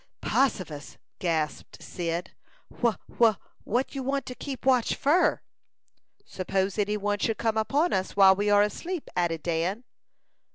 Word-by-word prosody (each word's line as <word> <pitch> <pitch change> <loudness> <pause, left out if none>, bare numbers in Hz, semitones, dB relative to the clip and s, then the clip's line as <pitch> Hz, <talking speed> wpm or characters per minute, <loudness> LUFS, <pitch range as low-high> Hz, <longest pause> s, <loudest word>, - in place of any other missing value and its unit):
"Possifus!" 180 - -1 0.2
gasped 160 -4 -2
Cyd. 170 0 -4 0.5
"Wha 235 -3 +3 0.2
wha 225 -3 +6 0.3
what 245 +5 -1
you 275 - -3
want 275 0 -1
to 255 - -6
keep 265 0 -7
watch 255 -3 +3
fur?" 320 +6 +2 0.8
"Suppose 190 +2 -2
any 210 +1 +1
one 205 0 -1
should 225 +1 0
come 225 -1 0
upon 280 +10 +1
us 190 0 -1
while 195 -1 +7
we 205 +2 0
are 205 0 +6
asleep?" 335 - -4
added 170 -3 0
Dan. 175 +7 -1
205 Hz, 140 wpm, -27 LUFS, 185-255 Hz, 0.8 s, while